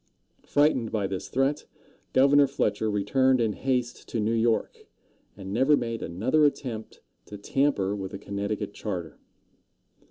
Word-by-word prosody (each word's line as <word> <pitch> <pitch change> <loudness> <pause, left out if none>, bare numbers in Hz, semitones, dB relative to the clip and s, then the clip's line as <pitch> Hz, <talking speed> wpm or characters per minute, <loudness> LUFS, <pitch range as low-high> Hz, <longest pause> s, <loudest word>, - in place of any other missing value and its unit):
Frightened 145 -6 +2
by 105 -3 -1
this 95 -1 -4
threat, 135 +3 0 0.5
Governor 140 +2 +5
Fletcher 110 -5 -1
returned 130 +6 +2
in 110 -3 +1
haste 125 -1 -2
to 115 - -2
New 110 +2 0
York, 115 0 0 0.5
and 95 -1 -7
never 135 +6 +4
made 115 -1 -3
another 115 - +1
attempt 125 -6 -2 0.3
to 105 - -8
tamper 105 -3 0
with 95 -2 -5
the 100 - -7
Connecticut 100 +1 -4
charter. 90 -7 -5
115 Hz, 135 wpm, -26 LUFS, 100-135 Hz, 0.5 s, Governor